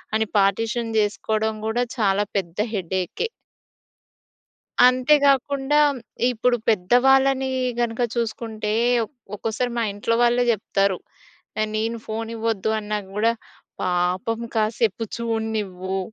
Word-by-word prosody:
అని 220 Hz, -1 st, +1 dB
పార్టిషన్ 225 Hz, +4 st, +1 dB
చేసుకోవడం 215 Hz, +1 st, 0 dB
కూడా 240 Hz, +2 st, +1 dB
చాలా 205 Hz, -1 st, +2 dB
పెద్ద 170 Hz, -1 st, -4 dB, 0.2 s
హెడేకే. 190 Hz, -, -2 dB, 1.6 s
అంతే 255 Hz, +4 st, +4 dB
గాకుండా 280 Hz, +1 st, +2 dB, 0.5 s
ఇప్పుడు 245 Hz, +1 st, +1 dB
పెద్దవాళ్ళని 265 Hz, +6 st, +3 dB, 0.3 s
గనుక 235 Hz, 0 st, -1 dB
చూసుకుంటే 220 Hz, -2 st, -2 dB, 0.3 s
ఒ -, -, -6 dB, 0.3 s
ఒక్కోసారి 225 Hz, +4 st, -2 dB
మా 230 Hz, -, +1 dB
ఇంట్లో 230 Hz, +3 st, 0 dB
వాళ్ళే 240 Hz, +1 st, +3 dB
చెప్తారు. 195 Hz, -3 st, 0 dB, 0.6 s
న 215 Hz, -, +2 dB
నేను 225 Hz, +2 st, -1 dB
ఫోన్ 225 Hz, +1 st, -4 dB
ఇవ్వద్దు 220 Hz, -2 st, -1 dB
అన్నా 210 Hz, 0 st, -3 dB
గూడా, 220 Hz, +3 st, +2 dB, 0.5 s
"పాపం 180 Hz, +5 st, 0 dB, 0.2 s
కాసేపు 220 Hz, 0 st, +1 dB
చూడనివ్వు" 215 Hz, -5 st, -2 dB
220 Hz, 105 wpm, -23 LUFS, 205-240 Hz, 1.6 s, అంతే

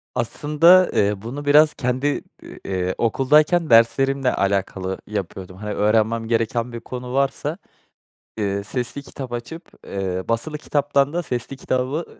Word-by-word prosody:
Aslında, 150 Hz, +9 st, +4 dB
eee, 100 Hz, 0 st, +2 dB
bunu 135 Hz, +7 st, -6 dB
biraz 150 Hz, +2 st, +5 dB
kendi, 130 Hz, +2 st, -1 dB, 0.2 s
iii, -, -, -12 dB
eee, 95 Hz, -1 st, -2 dB
okuldayken 150 Hz, +8 st, +3 dB
derslerimle 130 Hz, +3 st, +4 dB
alakalı 95 Hz, -1 st, -1 dB
yapıyordum. 95 Hz, -2 st, -6 dB
Hani, 105 Hz, +1 st, -5 dB
öğrenmem 110 Hz, +2 st, +1 dB
gereken 115 Hz, +1 st, 0 dB
bir 115 Hz, -, -5 dB
konu 125 Hz, +1 st, -7 dB
varsa, 140 Hz, +4 st, -1 dB, 0.8 s
ııı, 100 Hz, -1 st, -1 dB
sesli 125 Hz, +6 st, -4 dB
kitap 130 Hz, -3 st, -8 dB
açıp, 160 Hz, +9 st, -7 dB, 0.2 s
eee, 95 Hz, -1 st, -3 dB
basılı 150 Hz, +7 st, -1 dB
kitaptan 145 Hz, -1 st, 0 dB
da 175 Hz, 0 st, -1 dB
sesli 125 Hz, 0 st, -4 dB
kitabı 130 Hz, +5 st, -3 dB
125 Hz, 135 wpm, -22 LUFS, 105-145 Hz, 0.8 s, biraz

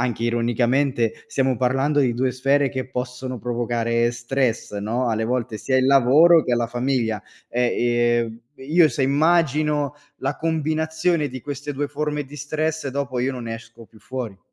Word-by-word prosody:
anche 120 Hz, -2 st, -1 dB
ironicamente, 120 Hz, +1 st, +1 dB
stiamo 130 Hz, -2 st, 0 dB
parlando 135 Hz, +4 st, +1 dB
di 125 Hz, -4 st, +2 dB
2 130 Hz, +1 st, +1 dB
sfere 135 Hz, +2 st, +2 dB
che 130 Hz, -1 st, -5 dB
possono 125 Hz, 0 st, -4 dB
provocare 120 Hz, 0 st, 0 dB
stress, 120 Hz, -2 st, -1 dB
no, 115 Hz, +5 st, -1 dB
alle 110 Hz, -1 st, 0 dB
volte 115 Hz, -2 st, -2 dB
sia 130 Hz, +5 st, 0 dB
il 130 Hz, 0 st, +3 dB
lavoro 140 Hz, +5 st, +6 dB
che 125 Hz, -, +1 dB
la 120 Hz, -1 st, 0 dB
famiglia. 120 Hz, -3 st, -1 dB, 0.3 s
E, 120 Hz, 0 st, 0 dB, 0.5 s
ehm, 115 Hz, +1 st, -11 dB
io 155 Hz, +5 st, +3 dB
se 145 Hz, -, -2 dB
immagino 150 Hz, 0 st, +2 dB, 0.2 s
la 135 Hz, +2 st, -2 dB
combinazione 160 Hz, +1 st, 0 dB
di 130 Hz, -1 st, -7 dB
queste 145 Hz, +2 st, -5 dB
2 145 Hz, +1 st, -2 dB
forme 150 Hz, 0 st, -2 dB
di 145 Hz, +1 st, -12 dB
stress, 155 Hz, +1 st, -2 dB
dopo 135 Hz, -1 st, -3 dB
io 130 Hz, +2 st, 0 dB
non 125 Hz, -2 st, -6 dB
ne 115 Hz, -1 st, -4 dB
esco 115 Hz, 0 st, -12 dB
più 110 Hz, -, -20 dB
fuori. 115 Hz, -5 st, -6 dB
130 Hz, 165 wpm, -22 LUFS, 120-145 Hz, 0.5 s, lavoro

